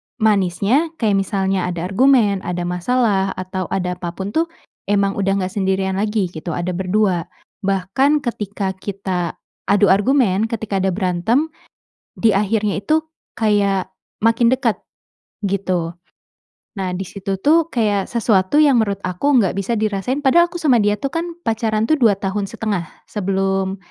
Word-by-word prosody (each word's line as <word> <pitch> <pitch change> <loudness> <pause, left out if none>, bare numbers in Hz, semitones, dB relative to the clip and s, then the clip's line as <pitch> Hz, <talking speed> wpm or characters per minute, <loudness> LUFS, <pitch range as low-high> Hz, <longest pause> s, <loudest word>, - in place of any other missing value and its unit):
manisnya, 215 - +1
kayak 210 -8 +1
misalnya 190 -2 0
ada 175 -2 -3
argumen, 220 -3 +4
ada 180 -1 -4
masalah, 195 +2 0
atau 185 -1 -4
ada 180 -1 -2
apapun 185 +3 -5
tuh 325 +7 +1 0.4
emang 200 -1 +2
udah 195 0 +1
enggak 185 -1 -2
sendirian 190 -1 0
lagi, 210 -4 0
gitu. 160 0 -5
Ada 175 +1 -2
ber-2 185 -1 0 0.4
bahkan 195 +10 +1
ketika 205 -6 -3
kita 190 -3 -3 0.3
adu 200 0 +4
argumen, 205 0 +3
ketika 220 -3 -3
ada 190 -1 +1
berantem, 205 - 0 0.7
di 220 -2 +3
akhirnya 205 0 0
itu 315 0 +1 0.3
kayak 200 -3 +2 0.3
makin 230 +1 +3
dekat, 255 -4 +1 0.7
gitu. 185 -4 -1 0.9
Nah, 190 -2 -2
di 185 0 -4
situ 195 -1 -4
tuh 325 +6 +3
kayak 205 -5 +1
sesuatu 220 +4 +2
yang 285 -4 +5
menurut 200 -3 -1
aku 185 +10 -1
enggak 215 -9 +3
bisa 200 +4 -2
dirasain 215 +6 -1
padahal 290 +5 +5
aku 345 - -5
sama 275 -6 +4
dia 210 -2 +2
tuh 275 - -1
kan 330 +4 -2 0.2
pacaran 225 -4 0
tuh 315 - +4
2 230 -7 +4
tahun 200 +1 -1
1/2 205 -6 -2 0.2
sebelum 195 -1 -1
200 Hz, 145 wpm, -19 LUFS, 190-230 Hz, 0.9 s, yang